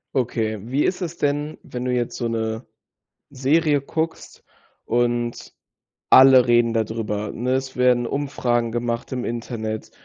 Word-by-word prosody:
Okay. 110 -4 -1
Wie 130 +7 -1
ist 190 - -1
es 170 -1 -4
denn, 145 +1 -1
wenn 125 0 -6
du 125 - 0
jetzt 120 -1 -2
so 120 - -2
'ne 110 +1 -3 0.7
Serie 145 +2 +2
guckst 160 +4 -4 0.4
und 120 0 -1 0.6
alle 130 -1 +8
reden 120 -1 +4
da 115 -1 +1
drüber, 105 -1 -3
ne? 125 +2 -2
Es 130 0 -3
werden 125 -1 +3
Umfragen 120 -4 -1
gemacht 120 +1 -3
im 125 -2 -3
Internet 115 -2 -4
120 Hz, 145 wpm, -22 LUFS, 115-135 Hz, 0.7 s, alle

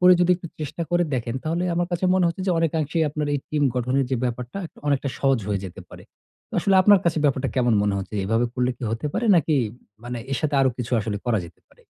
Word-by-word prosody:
করে 180 0 +8
যদি 180 0 +4
একটু 175 - -9
চেষ্টা 155 +3 -4
করে 175 0 +3
দেখেন 120 -1 -2
তাহলে 165 +3 -1
আমার 175 0 0
কাছে 175 +2 -1
মনে 185 -2 +3
হচ্ছে 170 +3 -4
যে - - +2
অনেকাংশেই 160 0 0
আপনার 150 0 -2
এই - - +1
টিম 150 -1 0
গঠনের 125 +2 +1
যে 130 - +1
ব্যাপারটা, 125 +6 -4
একটা - - -20
অনেকটা 140 -1 +1
সহজ 135 -2 +3
হয়ে 100 -2 -1
যেতে 90 - -8
পারে। - - -12 0.5
তো - - -52
আসলে 195 - +2
আপনার 205 0 +6
কাছে 165 -2 +1
ব্যাপারটা 135 -1 +1
কেমন 120 -3 +3
মনে 105 -1 +1
হচ্ছে? 95 +2 -6
এভাবে 115 +4 +1
করলে 125 0 +1
কি - - -14
হতে 115 +6 -2
পারে 240 - -1
নাকি 160 -1 +2 0.5
মানে 120 0 -4
এর 135 - +1
সাথে 150 -2 -1
আরো 135 -1 +4
কিছু 125 0 -4
আসলে 105 0 -3
করা 115 -3 +2
যেতে 85 - -18
পারে? - - -25
140 Hz, 240 wpm, -24 LUFS, 120-170 Hz, 0.5 s, করে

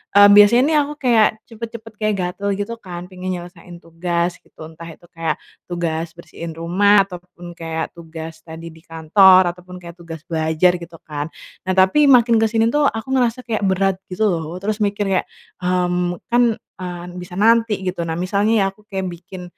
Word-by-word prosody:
eee, 205 0 +9
biasanya 205 +5 +7
nih 310 - +3
aku 295 +1 -1
kayak 230 -4 +5 0.2
cepet-cepet, 225 -1 -9
kayak 215 0 +1
gatel 200 +3 -3
gitu 205 +3 -4
kan, 175 -4 -8
pengen 185 0 -4
nyelesain 175 0 -10
tugas 170 +1 -2
gitu. - - -30
Entah 165 +1 -11
itu 175 - -21
kayak 165 -3 -2 0.3
tugas 170 -1 -3
bersihin 170 -1 -9
rumah, 195 +5 +4
ataupun 175 -2 -11
kayak 165 -1 -5
tugas 160 -1 -9
tadi 165 +1 -9
di 160 - -16
kantor, 180 +3 +5
ataupun 180 +1 -13
kayak 170 0 -11
tugas 165 -2 -9
belajar 160 +2 +2
gitu 170 0 -11
kan. 150 -1 -5 0.4
Nah, 185 - +1
tapi 190 +11 +4
makin 240 -3 +5
ke 225 - +3
sini 225 +1 +2
tuh, 295 0 +2
aku 225 +4 -4
ngerasa 250 -1 +1
kayak 220 -3 -3
berat 190 0 +1
gitu 190 +4 -3
loh, 165 0 -4
terus 210 +1 -2
mikir 205 0 0
kayak, 185 - +1 0.4
mmm, 180 -1 0
"Kan, 240 -1 +4
eee, 175 -1 -8
bisa 180 0 -9
nanti," 225 -1 +3
gitu. 185 -2 -3
Nah 160 - -3
misalnya 200 +4 +1
ya, - - +3
aku 210 +2 -19
kayak 190 -2 -4
bikin 180 +1 -9
180 Hz, 180 wpm, -20 LUFS, 170-210 Hz, 0.4 s, eee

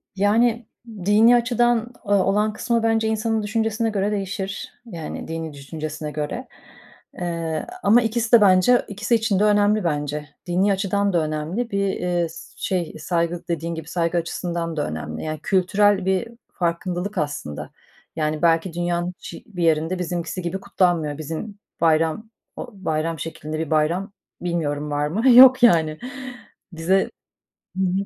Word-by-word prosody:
Yani 225 +3 +2 0.4
dini 220 +4 +6
açıdan 240 0 +1
o 205 -1 0
olan 205 +2 +2
kısmı 235 0 0
bence 225 -1 +2
insanın 220 0 0
düşüncesine 225 +1 0
göre 205 0 0
değişir, 195 0 -4
yani 170 -8 -7
dini 160 -1 -5
düşüncesine 150 +1 -6
göre... 155 - -4 0.7
Eee, 165 - -3 0.2
ama 230 +4 +6
ikisi 225 0 -1
de 235 -3 +8
bence 195 +5 +5
ikisi 220 +4 0
için 220 -4 +1
de 210 - +3
önemli 210 0 +3
bence. 150 -2 -2 0.2
Dini 190 +3 +2
açıdan 200 0 0
da 165 -2 +2
önemli, 160 +10 -3
bir, 200 0 +1
eee, 175 -2 -1 0.3
şey, 180 -4 -2
saygı, 170 +1 -2
dediğin 170 0 -2
gibi, 160 -1 -7
saygı 170 0 0
açısından 170 -1 -3
da 145 - 0
önemli. 80 0 -5
Yani 155 -1 -4
kültürel 195 +1 +2
bir 190 +4 +1 0.3
farkındalık 180 +2 -2
aslında. 145 - -4 0.4
Yani 155 0 -1
belki 165 +1 +2
dünyanın 175 +1 -1
hiç - - -9
bir 180 -5 -4
yerinde 165 +3 +1
bizimkisi 175 +1 -3
gibi 175 +3 -3
kutlanmıyor. 170 -7 0
Bizim 165 +7 -6 0.2
bayram, 165 +6 +2 0.3
o 245 - -7
bayram 165 -4 -2
şeklinde 155 -1 -5
bir 160 - -3
bayram, 170 +6 +1 0.3
bilmiyorum, 150 -4 -2
var 145 0 0
mı? 220 - +2
Yok 255 +1 +9
yani. 160 -8 +4 0.7
Bize 180 +4 +1 0.7
hı 190 - +1
hı. 180 - +1
180 Hz, 145 wpm, -22 LUFS, 160-210 Hz, 0.7 s, Yok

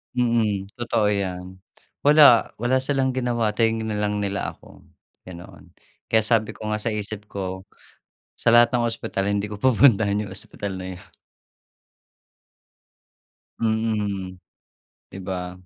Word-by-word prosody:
Mm, 110 -5 0
totoo 115 -3 0
'yan. 95 -2 -4 0.5
Wala. 145 -5 +6
Wala 120 +3 +1
silang 130 0 0
ginawa, 120 -4 0
tinignan 110 -1 0
lang 105 0 0
nila 100 0 -3
ako, - - -18 0.5
ganoon. 85 -1 -12 0.3
Kaya 110 -1 +3
sabi 110 0 +1
ko 110 0 -5
nga 105 - -1
sa 110 +1 -2
isip 105 0 -6
ko, 95 -1 -6 0.7
"Sa - - +2
lahat 120 +1 +6
ng 120 -1 +2
ospital, 100 -3 -3
hindi 100 0 0
ko 105 0 -8
pupuntahan 115 -5 +4
'yong 95 - -9
ospital 100 0 -6
na 95 - -6
'yon." 95 - -17 2.5
Mm, 105 -4 -1 0.8
'di - - -8
ba? 90 -1 -5
105 Hz, 125 wpm, -23 LUFS, 100-115 Hz, 2.5 s, Wala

